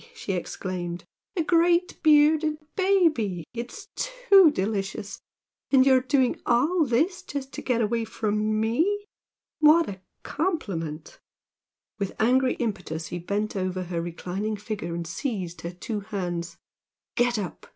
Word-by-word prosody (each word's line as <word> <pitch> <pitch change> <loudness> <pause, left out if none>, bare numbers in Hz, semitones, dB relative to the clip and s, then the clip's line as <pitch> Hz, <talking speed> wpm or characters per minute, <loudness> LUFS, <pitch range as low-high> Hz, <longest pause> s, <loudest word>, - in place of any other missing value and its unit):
she 210 - -4
exclaimed 175 -1 -4 0.3
"A 335 - +2
big 345 +2 +2
bearded 305 0 +4 0.2
baby! 315 - +2
It's 240 0 -7
too - - +5
delicious! 200 -4 -3 0.5
And 265 -2 +5
you're 260 -1 +5
doing 255 -1 +1
all 305 +8 +3
this 290 +10 +1
just 275 -1 -6
to - - -5
get 240 -2 0
away 230 +1 0
from 215 0 -1
ME! 330 - +1 0.5
What 310 +2 +6
a 190 -2 -7 0.2
compliment!" 180 - -3 0.8
With 195 -1 -4
angry 255 +3 +3
impetus 180 -8 -3
he 175 - -4
bent 205 +5 -2
over 185 -1 -2
her 170 -1 -3
reclining 185 +5 -4
figure 205 -5 -5
and 170 0 -4
seized 180 - -4
her 170 - -5
two 205 +4 -4
hands. 180 -5 -4 0.6
"Get 240 -1 +2
up!" 185 -7 -6
225 Hz, 130 wpm, -26 LUFS, 185-300 Hz, 0.8 s, What